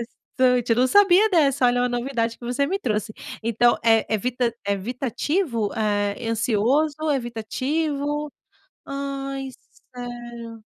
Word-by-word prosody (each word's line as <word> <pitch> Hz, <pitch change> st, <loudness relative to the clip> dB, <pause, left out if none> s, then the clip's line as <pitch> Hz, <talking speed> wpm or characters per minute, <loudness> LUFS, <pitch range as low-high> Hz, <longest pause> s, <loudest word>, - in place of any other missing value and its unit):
Interessante, 250 Hz, -2 st, +1 dB
eu -, -, +5 dB
não 255 Hz, +2 st, +3 dB
sabia 405 Hz, +4 st, +5 dB
dessa, 285 Hz, -8 st, +3 dB
olha 245 Hz, 0 st, +3 dB
uma 250 Hz, -, +1 dB
novidade 240 Hz, -2 st, -2 dB
que 240 Hz, -, -10 dB
você 250 Hz, +4 st, 0 dB
me 390 Hz, +5 st, -1 dB
trouxe, 215 Hz, -, -2 dB, 0.3 s
então 235 Hz, +1 st, +3 dB
é 225 Hz, -1 st, +4 dB
evita 240 Hz, +2 st, 0 dB
é 200 Hz, -, +1 dB
evitativo, 240 Hz, -, -2 dB
é 205 Hz, +1 st, -1 dB
ansioso, 235 Hz, +7 st, +1 dB, 0.2 s
evitativo, 285 Hz, +5 st, -2 dB, 0.5 s
ai 275 Hz, -1 st, -4 dB, 0.4 s
sério. 240 Hz, -2 st, -8 dB
245 Hz, 125 wpm, -23 LUFS, 230-275 Hz, 0.5 s, eu